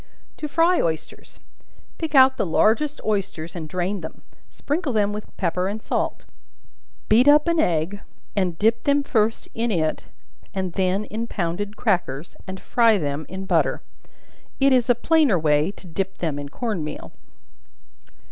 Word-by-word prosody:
To 300 Hz, -, -4 dB
Fry 335 Hz, +4 st, +3 dB
Oysters. 160 Hz, -1 st, -4 dB, 0.6 s
Pick 320 Hz, -3 st, -3 dB
out 260 Hz, 0 st, +7 dB
the -, -, +1 dB
largest 230 Hz, -, +2 dB
oysters 195 Hz, -6 st, -2 dB
and 160 Hz, -3 st, -6 dB
drain 185 Hz, +2 st, -2 dB
them; 160 Hz, -, -9 dB, 0.3 s
sprinkle 295 Hz, -2 st, -2 dB
them 205 Hz, -1 st, +1 dB
with 210 Hz, 0 st, -8 dB
pepper 180 Hz, 0 st, 0 dB
and 205 Hz, +3 st, -3 dB
salt; -, -, -2 dB, 0.8 s
beat 235 Hz, +5 st, +5 dB
up 295 Hz, +2 st, +6 dB
an 335 Hz, -1 st, +2 dB
egg, 175 Hz, -, 0 dB, 0.3 s
and 180 Hz, -4 st, 0 dB
dip 225 Hz, +4 st, +2 dB
them 285 Hz, 0 st, +3 dB
first 225 Hz, -4 st, 0 dB
in 230 Hz, +1 st, -1 dB
it, 160 Hz, -6 st, -1 dB, 0.5 s
and 185 Hz, -2 st, -2 dB
then 190 Hz, +2 st, 0 dB
in 225 Hz, +3 st, -4 dB
pounded 200 Hz, +3 st, -3 dB
crackers, 175 Hz, -, -1 dB
and 190 Hz, 0 st, -6 dB
fry 230 Hz, -1 st, +3 dB
them 145 Hz, -2 st, -3 dB
in 190 Hz, +1 st, -6 dB
butter. -, -, +1 dB, 0.8 s
It 275 Hz, 0 st, +5 dB
is 250 Hz, -2 st, +2 dB
a 245 Hz, -, +5 dB
plainer 300 Hz, -, +3 dB
way 150 Hz, 0 st, +2 dB
to 190 Hz, -, -16 dB
dip 190 Hz, +3 st, -4 dB
them 155 Hz, -4 st, -2 dB
in 145 Hz, 0 st, -6 dB
corn 210 Hz, -, -3 dB
meal. 150 Hz, 0 st, -7 dB
200 Hz, 155 wpm, -23 LUFS, 170-240 Hz, 0.8 s, out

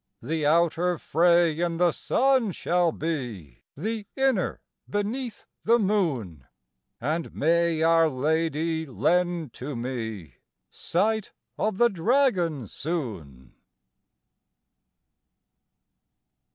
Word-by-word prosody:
The 155 Hz, +3 st, -1 dB
outer 170 Hz, +2 st, +2 dB
fray 170 Hz, 0 st, +3 dB
in 170 Hz, -1 st, 0 dB
the 175 Hz, 0 st, +3 dB
sun 255 Hz, -, +1 dB
shall 175 Hz, 0 st, +1 dB
be, 120 Hz, -, -5 dB, 0.2 s
The 215 Hz, +5 st, -3 dB
inner 265 Hz, -8 st, +1 dB, 0.3 s
beneath 220 Hz, +4 st, -3 dB, 0.2 s
the 235 Hz, +2 st, +4 dB
moon; 150 Hz, -, -1 dB, 0.5 s
And 155 Hz, +6 st, -2 dB
may 165 Hz, +1 st, +2 dB
Our 165 Hz, 0 st, +4 dB
Lady 160 Hz, +3 st, -1 dB
lend 170 Hz, +1 st, 0 dB
to 135 Hz, +2 st, -6 dB
me 115 Hz, -, -5 dB, 0.3 s
Sight 215 Hz, +4 st, -1 dB, 0.2 s
of 215 Hz, -3 st, -1 dB
the 240 Hz, +2 st, +5 dB
Dragon 185 Hz, -, +1 dB
soon! 95 Hz, -, -6 dB
165 Hz, 90 wpm, -26 LUFS, 145-190 Hz, 0.5 s, the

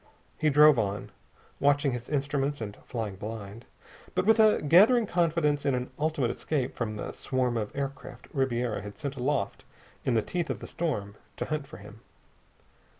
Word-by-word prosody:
He 155 Hz, -, +3 dB
drove 150 Hz, -2 st, +7 dB
on, 100 Hz, -1 st, -2 dB, 0.5 s
watching 145 Hz, 0 st, +3 dB
his 120 Hz, -1 st, -5 dB
instruments 140 Hz, 0 st, -1 dB
and 105 Hz, -3 st, -5 dB
flying 110 Hz, -5 st, -4 dB
blind, 105 Hz, +2 st, -7 dB, 0.5 s
but -, -, +1 dB
with 220 Hz, +1 st, +5 dB
a 215 Hz, -1 st, +6 dB
gathering 215 Hz, -, +6 dB
confidence 165 Hz, -5 st, +1 dB
in 140 Hz, -2 st, +2 dB
an 125 Hz, 0 st, -3 dB
ultimate 145 Hz, -6 st, +1 dB
escape 135 Hz, -5 st, -2 dB
from 110 Hz, -3 st, -3 dB
the 105 Hz, -, -5 dB
swarm 130 Hz, -2 st, -1 dB
of 105 Hz, -2 st, -1 dB
aircraft 135 Hz, -3 st, -5 dB
Ribiera 125 Hz, -5 st, 0 dB
had 105 Hz, 0 st, -9 dB
sent 140 Hz, -2 st, -4 dB
aloft 130 Hz, -5 st, -1 dB, 0.4 s
in 125 Hz, -, +1 dB
the 110 Hz, -, +2 dB
teeth 175 Hz, +4 st, -3 dB
of -, -, -1 dB
the -, -, -9 dB
storm 105 Hz, -12 st, -3 dB, 0.2 s
to -, -, -3 dB
hunt 155 Hz, -2 st, -3 dB
for -, -, -10 dB
him. -, -, -13 dB
135 Hz, 170 wpm, -28 LUFS, 115-150 Hz, 0.5 s, drove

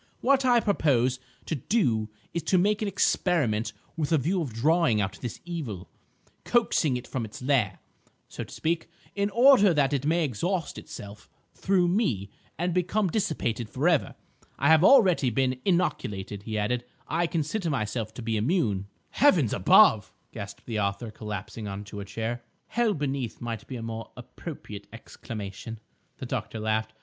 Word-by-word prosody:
What 270 Hz, 0 st, +3 dB
I 245 Hz, -2 st, +5 dB
propose 130 Hz, -, +2 dB, 0.3 s
to -, -, -3 dB
do 120 Hz, -, +1 dB, 0.2 s
is 170 Hz, -, -1 dB
to 185 Hz, -, +4 dB
make 205 Hz, +4 st, +2 dB
an 215 Hz, -, 0 dB
experiment 145 Hz, -, +1 dB, 0.2 s
with 155 Hz, -2 st, -2 dB
a 160 Hz, -, +5 dB
view 175 Hz, +7 st, 0 dB
of 140 Hz, -7 st, -3 dB
drawing 150 Hz, +1 st, +2 dB
out 100 Hz, 0 st, -2 dB
this 120 Hz, -, -5 dB
evil, 130 Hz, -, -5 dB, 0.6 s
coaxing 170 Hz, -, +2 dB
it 125 Hz, -, -8 dB
from 130 Hz, -, -3 dB
its 110 Hz, -, -8 dB
lair, 125 Hz, -7 st, +1 dB, 0.5 s
so -, -, -6 dB
to -, -, -13 dB
speak, 165 Hz, +1 st, -2 dB, 0.2 s
in 200 Hz, 0 st, 0 dB
order 230 Hz, -, +6 dB
that 145 Hz, -1 st, +2 dB
it 140 Hz, -2 st, 0 dB
may 165 Hz, +3 st, +2 dB
exhaust 165 Hz, -, -2 dB
itself 100 Hz, 0 st, -10 dB, 0.2 s
through 185 Hz, -2 st, +2 dB
me 130 Hz, -, 0 dB, 0.3 s
and 175 Hz, +2 st, -1 dB
become 180 Hz, +2 st, +1 dB
dissipated 120 Hz, -, -1 dB
for 135 Hz, +8 st, 0 dB
ever. 165 Hz, -5 st, +2 dB, 0.4 s
I 140 Hz, -, +2 dB
have 160 Hz, +1 st, +6 dB
already 190 Hz, -, +6 dB
been 130 Hz, +2 st, 0 dB
inoculated," 105 Hz, -, -1 dB
he 110 Hz, +1 st, -4 dB
added; 120 Hz, +4 st, 0 dB, 0.2 s
"I 170 Hz, +2 st, +1 dB
consider 165 Hz, +3 st, -1 dB
myself 110 Hz, -4 st, -2 dB
to 120 Hz, -, -7 dB
be 115 Hz, -1 st, 0 dB
immune." 105 Hz, -, 0 dB, 0.2 s
"Heavens 180 Hz, -, +4 dB
above!" 105 Hz, +2 st, +5 dB, 0.2 s
gasped 100 Hz, -3 st, -8 dB
the 110 Hz, -3 st, -2 dB
author, 100 Hz, +3 st, -2 dB
collapsing 105 Hz, 0 st, -6 dB
on 100 Hz, +1 st, -5 dB
to 105 Hz, 0 st, -8 dB
a 100 Hz, -, -6 dB
chair. 115 Hz, +4 st, -4 dB, 0.3 s
"Hell 235 Hz, -3 st, +1 dB
beneath! 135 Hz, -5 st, -3 dB
might 115 Hz, -2 st, -5 dB
be 130 Hz, -, -6 dB
a 115 Hz, -, -5 dB
more 115 Hz, 0 st, -5 dB
appropriate 115 Hz, -, -9 dB
exclamation," 115 Hz, -1 st, -8 dB, 0.4 s
the -, -, -6 dB
doctor 115 Hz, -3 st, -4 dB
laughed. 110 Hz, 0 st, -1 dB
130 Hz, 165 wpm, -27 LUFS, 110-175 Hz, 0.6 s, order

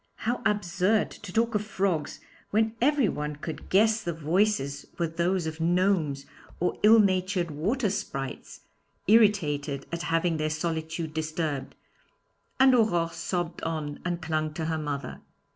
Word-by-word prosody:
How 240 Hz, +3 st, -2 dB
absurd 205 Hz, 0 st, +1 dB
to 205 Hz, -, -10 dB
talk 230 Hz, +3 st, +1 dB
of 210 Hz, -1 st, 0 dB
frogs 190 Hz, -6 st, -1 dB, 0.3 s
when 220 Hz, +1 st, +2 dB
everyone 230 Hz, -, +1 dB
could 155 Hz, +2 st, -7 dB
guess 220 Hz, +3 st, +4 dB
the 170 Hz, -5 st, -3 dB
voices 160 Hz, -2 st, 0 dB
were 170 Hz, -, +1 dB
those 170 Hz, +2 st, 0 dB
of 160 Hz, 0 st, -5 dB
gnomes 170 Hz, -5 st, +1 dB, 0.3 s
or 180 Hz, -, -1 dB
ill 220 Hz, +2 st, +7 dB
natured 185 Hz, -3 st, +1 dB
water 205 Hz, -, 0 dB
sprites, 135 Hz, -8 st, -5 dB, 0.4 s
irritated 165 Hz, -10 st, +3 dB
at 170 Hz, 0 st, -3 dB
having 165 Hz, -1 st, +1 dB
their 155 Hz, 0 st, 0 dB
solitude 160 Hz, 0 st, -3 dB
disturbed, 155 Hz, -3 st, -3 dB, 0.8 s
and 265 Hz, 0 st, +7 dB
Aurore 175 Hz, -9 st, +2 dB
sobbed 175 Hz, -1 st, -3 dB
on, 155 Hz, -3 st, -3 dB
and 175 Hz, -1 st, -3 dB
clung 155 Hz, -1 st, -1 dB
to 160 Hz, -, -3 dB
her 160 Hz, 0 st, -1 dB
mother. 140 Hz, -3 st, -4 dB
170 Hz, 140 wpm, -27 LUFS, 155-205 Hz, 0.8 s, ill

